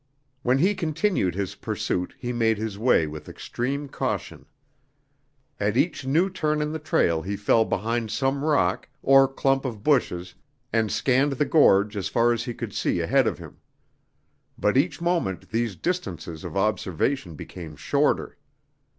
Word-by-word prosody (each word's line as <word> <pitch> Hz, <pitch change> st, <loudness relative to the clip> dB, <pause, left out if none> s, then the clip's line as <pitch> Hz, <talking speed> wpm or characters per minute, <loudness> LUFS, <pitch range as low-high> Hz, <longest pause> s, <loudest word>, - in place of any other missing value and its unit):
When 125 Hz, +1 st, +2 dB
he 185 Hz, +8 st, +3 dB
continued 165 Hz, -, 0 dB
his 100 Hz, -1 st, -3 dB
pursuit 90 Hz, 0 st, -3 dB
he 125 Hz, 0 st, -4 dB
made 115 Hz, -2 st, +2 dB
his 110 Hz, -1 st, -4 dB
way 110 Hz, -6 st, +3 dB
with 75 Hz, 0 st, -8 dB
extreme 140 Hz, +4 st, -4 dB
caution. -, -, -4 dB, 1.1 s
At 105 Hz, +3 st, 0 dB
each 135 Hz, -3 st, 0 dB
new 165 Hz, +8 st, +3 dB
turn 155 Hz, -5 st, -1 dB
in 150 Hz, 0 st, -1 dB
the 160 Hz, -, -4 dB
trail 85 Hz, -, +1 dB
he 100 Hz, +4 st, -3 dB
fell 110 Hz, +2 st, +3 dB
behind 115 Hz, +3 st, -1 dB
some 135 Hz, +5 st, 0 dB
rock 125 Hz, -, +1 dB
or 135 Hz, 0 st, +6 dB
clump 135 Hz, 0 st, 0 dB
of 115 Hz, -6 st, -5 dB
bushes 90 Hz, -12 st, +1 dB, 0.4 s
and 110 Hz, -2 st, +1 dB
scanned 135 Hz, +2 st, +2 dB
the 145 Hz, +2 st, 0 dB
gorge 105 Hz, -10 st, +4 dB
as 100 Hz, -3 st, -2 dB
far 120 Hz, 0 st, +3 dB
as 120 Hz, 0 st, -3 dB
he 120 Hz, -, -4 dB
could -, -, -6 dB
see -, -, 0 dB
ahead -, -, +2 dB
of -, -, -1 dB
him. -, -, -12 dB, 1.0 s
But 105 Hz, -, +1 dB
each 155 Hz, +5 st, +1 dB
moment 170 Hz, -, -1 dB
these 115 Hz, -2 st, -1 dB
distances 90 Hz, -, -4 dB
of -, -, -5 dB
observation 95 Hz, -, -1 dB
became 80 Hz, 0 st, -9 dB
shorter. -, -, 0 dB
120 Hz, 160 wpm, -25 LUFS, 100-140 Hz, 1.1 s, or